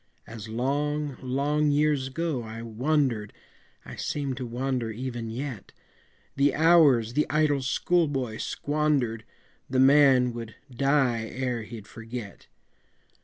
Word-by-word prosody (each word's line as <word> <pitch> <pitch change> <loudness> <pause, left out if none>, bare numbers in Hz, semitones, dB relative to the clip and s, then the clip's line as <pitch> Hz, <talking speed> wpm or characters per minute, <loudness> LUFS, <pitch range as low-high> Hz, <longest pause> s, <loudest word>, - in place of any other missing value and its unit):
As 110 -1 -9
long, 145 +4 -1
long 145 +4 +1
years 145 -2 +2
ago 155 -1 -2
I 115 0 -7
wandered, 120 -2 0 0.5
I - - -9
seem 140 -2 -2
to 125 -1 -5
wander 125 0 -2
even 120 0 -5
yet, 120 -3 -6 0.6
The 140 0 +2
hours 145 -8 +5
the 150 - +1
idle 150 -2 +2
school 165 +6 +1
boy 130 -6 -3
squandered, 145 -7 -1 0.4
The 130 - 0
man 135 -2 +5
would 115 -1 -7 0.2
die 130 -4 +2
ere 125 -1 -3
he'd 110 -1 -9
forget. 115 -1 -9
130 Hz, 120 wpm, -27 LUFS, 115-145 Hz, 0.6 s, hours